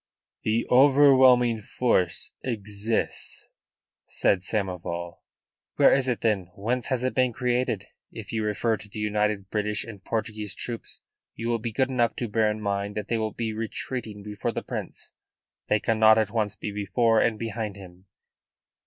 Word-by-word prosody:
"The 110 +2 0
overwhelming 130 -3 +6
force 95 -6 0
exists," 105 -2 -3 0.6
said 100 - +2
Samoval. 90 -3 -3 0.6
"Where - - +6
is 135 -1 +2
it 125 -2 -1
then? 100 -6 0
Whence 120 +5 -1
has 125 -2 -1
it 130 - 0
been 130 -1 +2
created? 125 -4 0 0.3
If - - -8
you 110 -1 0
refer 105 +2 0
to 105 +2 -13
the 105 - -10
united 105 -2 -1
British 105 -1 -1
and 105 -4 -10
Portuguese 110 -3 -3
troops, 120 -2 -6 0.3
you 115 +1 -3
will 115 -1 +1
be 115 +1 -4
good 130 +4 +1
enough 120 -3 +1
to 120 - -3
bear 110 0 +2
in 105 0 -3
mind 100 0 -2
that 105 -1 -4
they 115 - +1
will 110 -1 -2
be 115 -2 -3
retreating 110 -1 -4
before 105 -1 -3
the - - -4
Prince. - - -6 0.5
They 105 - +3
cannot 110 -1 +5
at 110 -2 +1
once 110 -3 -1
be 105 - -5
before 110 +3 +2
and 110 -2 +2
behind 110 -2 -4
him." 95 -1 -13
110 Hz, 160 wpm, -26 LUFS, 105-120 Hz, 0.6 s, overwhelming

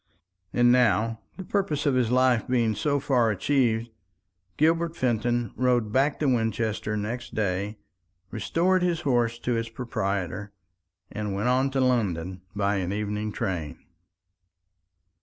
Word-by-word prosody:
And 120 0 +4
now, 115 -2 +3 0.2
the 190 - -6
purpose 185 -7 -1
of 140 - +3
his 125 -3 +2
life 125 -2 +3
being 120 -3 +2
so 145 +7 0
far 125 -4 +2
achieved, 115 +1 +1 0.7
Gilbert 165 +2 +2
Fenton 120 - 0
rode 120 -3 +1
back 135 +4 +2
to - - +2
Winchester 110 -3 0
next 115 +4 -5
day, 100 0 -1 0.5
restored 175 - +1
his 175 -2 0
horse 120 -4 +1
to 120 0 -1
its 115 0 -2
proprietor, 100 -4 -3 0.6
and 105 -2 -3
went 105 +5 0
on 130 +2 +2
to 135 0 0
London 95 -8 0
by 100 0 +1
an 95 -1 -2
evening 105 +1 -2
train. 90 -9 -3
115 Hz, 135 wpm, -26 LUFS, 105-130 Hz, 0.7 s, And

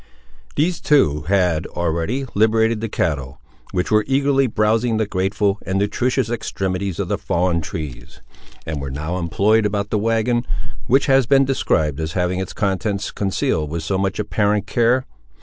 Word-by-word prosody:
These 165 +3 0
two 75 - +3
had, 90 -4 +2
already, 85 +10 -2
liberated 110 +1 +2
the 115 - -3
cattle, 70 -8 -2 0.3
which 90 -1 -1
were 110 0 +4
eagerly 135 0 +2
browsing 110 +1 +1
the 110 - +1
grateful 100 +1 0
and 95 0 -2
nutritious 125 +5 0
extremities 95 -5 -3
of - - -2
the - - -1
fallen 85 -1 0
trees, 70 -5 -7 0.5
and 75 -3 -4
were 70 - -4
now 75 +7 -3
employed 105 +6 +2
about 105 0 -1
the 105 - +1
wagon, 115 +2 +1 0.4
which 135 +3 +4
has 135 -3 +4
been 135 0 +5
described 80 - 0
as 80 0 -3
having 90 0 0
its 95 - -4
contents 100 0 -1
concealed 95 -6 -1
with 80 +1 -4
so 95 +3 -1
much 95 -1 -1
apparent 105 -1 0
care. 120 +4 +2
100 Hz, 160 wpm, -20 LUFS, 85-115 Hz, 0.5 s, been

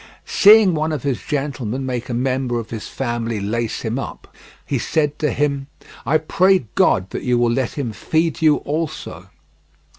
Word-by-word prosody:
Seeing 210 -2 +6
one 155 0 -1
of 150 -5 -3
his 135 -4 -1
gentlemen 135 -4 -3
make 125 -1 -4
a 120 - -2
member 130 -1 0
of 115 - -8
his 110 -2 -5
family 120 -3 -3
lace 110 +3 -2
him 115 +3 -2
up, - - -8 0.3
he - - -1
said 150 -2 0
to 150 - +1
him: 140 0 -1 0.4
"I 155 +4 +4
pray 185 +2 +2
God 95 +1 +2
that - - -4
you 125 -1 +1
will 120 -1 +2
let 130 -1 -1
him 135 -6 -3
feed 160 - -1
you 155 -2 +5
also." 155 +1 -4
135 Hz, 175 wpm, -20 LUFS, 120-155 Hz, 0.4 s, Seeing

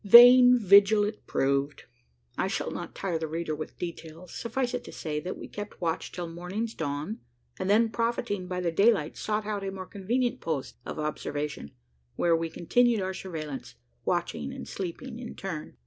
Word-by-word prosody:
Vain 245 +4 +10
vigil 205 0 +6
it 210 +1 -4
proved. 140 +1 0 0.5
I - - 0
shall - - -2
not - - -6
tire 180 -4 -2
the 160 - -2
reader 160 0 -2
with 155 +1 -7
details. 170 0 -7
Suffice 245 +1 -2
it - - -2
to - - -9
say, 150 -2 -3
that 180 +4 -5
we - - -8
kept 205 0 -7
watch 165 -3 -2
till 175 -1 -4
morning's 180 +7 -4
dawn; 150 +7 -3 0.4
and 185 - -1
then, 225 +3 +5
profiting 230 -5 -1
by 180 0 -2
the 170 -2 0
daylight, 195 -3 +3
sought 210 0 -2
out 205 -2 -2
a 195 - -2
more 190 -1 -6
convenient 240 +7 -1
post 155 -5 -3
of - - -5
observation, 150 - -3 0.5
where 170 -1 +3
we 165 0 -1
continued 230 +8 +2
our 190 0 -2
surveillance 155 -7 -6 0.3
watching 75 -2 -1
and - - -7
sleeping 225 +7 -5
in 245 - -7
turn. 160 -6 -6
185 Hz, 180 wpm, -28 LUFS, 160-220 Hz, 0.5 s, Vain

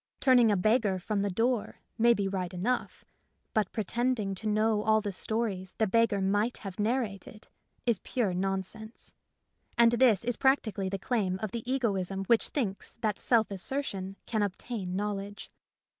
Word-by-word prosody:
Turning 245 -4 +5
a 205 - +2
beggar 215 0 +2
from 200 +3 -2
the 200 - 0
door 225 +4 0 0.2
may 235 +1 +5
be 205 -4 +1
right 185 -2 -3
enough, 240 +8 -2 0.5
but 215 -3 +1
pretending 225 -1 -1
to 205 +3 -5
know 215 0 +2
all 220 0 +3
the 205 -1 -3
stories 195 -2 -3
the 220 - +3
beggar 230 0 +2
might 205 +5 +1
have 195 -2 -8
narrated 215 -2 -2 0.4
is 235 -5 +2
pure 220 -8 -1
non 190 +1 0
sense; 220 +4 -11 0.6
and 235 0 +6
this 235 -4 +4
is 245 -1 -1
practically 215 -8 +1
the 195 - -2
claim 195 -3 -1
of 215 -2 -4
the 235 +2 -4
egoism 195 -7 -1
which 230 +2 +3
thinks 210 -9 -3
that 215 -3 0
self 225 -4 +2
assertion 195 -2 -3
can 220 -2 -1
obtain 200 -1 -3
knowledge. 205 0 -4
210 Hz, 160 wpm, -29 LUFS, 195-235 Hz, 0.6 s, and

